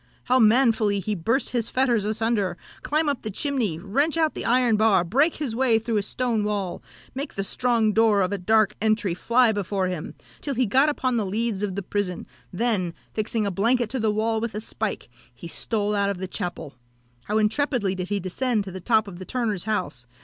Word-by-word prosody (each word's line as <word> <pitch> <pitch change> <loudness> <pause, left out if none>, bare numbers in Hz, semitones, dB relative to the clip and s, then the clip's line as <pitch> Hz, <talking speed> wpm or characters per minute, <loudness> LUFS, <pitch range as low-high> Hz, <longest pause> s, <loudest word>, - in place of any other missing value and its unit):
how 255 +1 +3
manfully 220 -3 +4
he 210 +3 -2
burst 225 +9 0
his 235 -3 -1
fetters 245 -5 +1
asunder, 215 -4 0 0.2
climb 305 +1 0
up 280 -4 -1
the 220 - -4
chimney, 235 - -1
wrench 275 - 0
out 320 -2 +1
an - - -4
iron 245 -1 +3
bar, 210 -4 +4
break 275 - +2
his 270 -7 -3
way 245 -2 +3
through 225 0 -1
a - - +2
stone 230 +1 -1
wall, 205 -4 -2 0.3
make 275 +3 -5
the 195 - -1
strong 230 0 +1
door 220 -2 +4
of 185 0 0
a 200 - -2
dark 215 +2 +3
entry 215 -4 +1
fly 235 +6 +3
before 200 -2 -1
him, 180 0 -4 0.3
till 280 -2 -2
he 255 +1 +2
got 265 +8 +4
upon 255 -4 0
the 220 - +1
leads 210 +1 -2
of 200 -3 -2
the 200 - -3
prison, 190 -2 -3 0.3
then, 185 -4 0 0.2
fixing 215 0 -1
a 200 - 0
blanket 230 +5 +1
to 260 - -2
the 220 -1 +1
wall 220 +1 0
with 230 -2 -3
a - - -2
spike, 220 -1 -4 0.3
he 170 - -9
stole 210 +4 -2
out 200 -1 +1
of 200 - -2
the 190 +1 -4
chapel! 180 -6 -5 0.5
How 210 - 0
intrepidly 220 -1 +1
did 185 -1 -5
he 205 -1 0
descend 215 +4 -1
to 195 - -8
the 185 0 -7
top 220 +1 +2
of 180 -3 -9
the 185 - -7
turner's 215 -7 -2
house! 180 - -3
215 Hz, 210 wpm, -24 LUFS, 195-240 Hz, 0.5 s, manfully